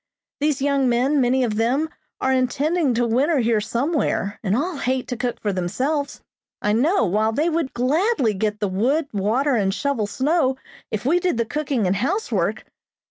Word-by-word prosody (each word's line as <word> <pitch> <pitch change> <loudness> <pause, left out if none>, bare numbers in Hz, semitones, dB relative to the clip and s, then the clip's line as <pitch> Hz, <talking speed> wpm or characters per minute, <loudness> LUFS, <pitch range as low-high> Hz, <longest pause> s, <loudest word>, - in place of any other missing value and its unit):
These 290 -2 0
young 280 -2 +2
men, 265 +4 +2
many 255 +1 +2
of 215 -3 -1
them, 255 +8 +1 0.3
are 265 - +1
intending 280 +3 +1
to 240 +1 +2
winter 270 +8 +2
here 230 -3 +2
somewhere, 235 - -1
and 200 -2 0
all 330 +3 -2
hate 260 -1 -1
to 250 - -2
cook 245 0 -3
for 205 -2 -1
themselves, 260 - -2 0.4
I 210 - 0
know, 305 - +2
while 215 +4 +1
they 310 +8 +1
would 320 -4 -2
gladly 275 - +1
get 210 +1 -2
the 205 - 0
wood, 255 +12 0
water, 230 +8 +1
and 195 -4 +1
shovel 225 -1 -1
snow, 265 +3 +1 0.3
if 215 +1 -4
we 335 +6 +3
did 360 -8 0
the 230 - +1
cooking 270 -3 -1
and 185 +2 +1
housework. 380 - -1
255 Hz, 180 wpm, -22 LUFS, 220-295 Hz, 0.4 s, we